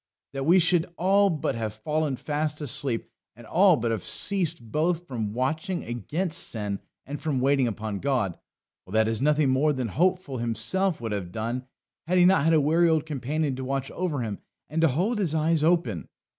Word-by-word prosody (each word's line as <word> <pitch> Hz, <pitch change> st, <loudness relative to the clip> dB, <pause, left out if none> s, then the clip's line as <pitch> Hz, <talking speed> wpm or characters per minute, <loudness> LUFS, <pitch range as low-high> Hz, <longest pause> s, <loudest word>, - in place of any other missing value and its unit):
That 135 Hz, +1 st, -3 dB
we 175 Hz, +3 st, +6 dB
should 175 Hz, -1 st, +3 dB
all 195 Hz, +3 st, +4 dB
but 160 Hz, -5 st, -1 dB
have 110 Hz, -2 st, -4 dB
fallen 150 Hz, +5 st, -1 dB
fast 150 Hz, +2 st, -2 dB
asleep, 140 Hz, -4 st, 0 dB, 0.2 s
and 120 Hz, +1 st, -14 dB
all 180 Hz, -, +4 dB
but 115 Hz, -1 st, -1 dB
have 110 Hz, -4 st, -1 dB
ceased 170 Hz, -, -1 dB
both 170 Hz, +3 st, 0 dB
from 110 Hz, -5 st, -3 dB
watching 155 Hz, -, -2 dB
against 155 Hz, -, -3 dB
sin 105 Hz, -3 st, -4 dB, 0.3 s
and 145 Hz, +2 st, -6 dB
from 145 Hz, -5 st, -1 dB
waiting 135 Hz, 0 st, +3 dB
upon 110 Hz, -2 st, -4 dB
God 125 Hz, -10 st, -1 dB, 0.4 s
well, 95 Hz, -, -13 dB
that 110 Hz, 0 st, +3 dB
is 115 Hz, 0 st, -1 dB
nothing 150 Hz, 0 st, +3 dB
more 145 Hz, +4 st, +3 dB
than 130 Hz, -4 st, -2 dB
Hopeful 175 Hz, -, 0 dB
himself 120 Hz, -, 0 dB
would 115 Hz, -2 st, -3 dB
have 95 Hz, -4 st, -3 dB
done 120 Hz, +5 st, -3 dB, 0.4 s
had 180 Hz, +2 st, +2 dB
he 180 Hz, -, +6 dB
not 190 Hz, -4 st, +5 dB
had 165 Hz, +1 st, +3 dB
a 160 Hz, -, +5 dB
wary 165 Hz, +4 st, +3 dB
old 160 Hz, -1 st, +2 dB
companion 145 Hz, 0 st, -2 dB
to 130 Hz, -, -4 dB
watch 135 Hz, +1 st, -3 dB
over 170 Hz, -7 st, -2 dB
him, 110 Hz, -4 st, -4 dB, 0.3 s
and 160 Hz, +1 st, 0 dB
to 165 Hz, -, +5 dB
hold 185 Hz, -, 0 dB
his 170 Hz, -6 st, 0 dB
eyes 160 Hz, 0 st, +2 dB
open. 160 Hz, -, +1 dB
145 Hz, 195 wpm, -26 LUFS, 115-165 Hz, 0.4 s, we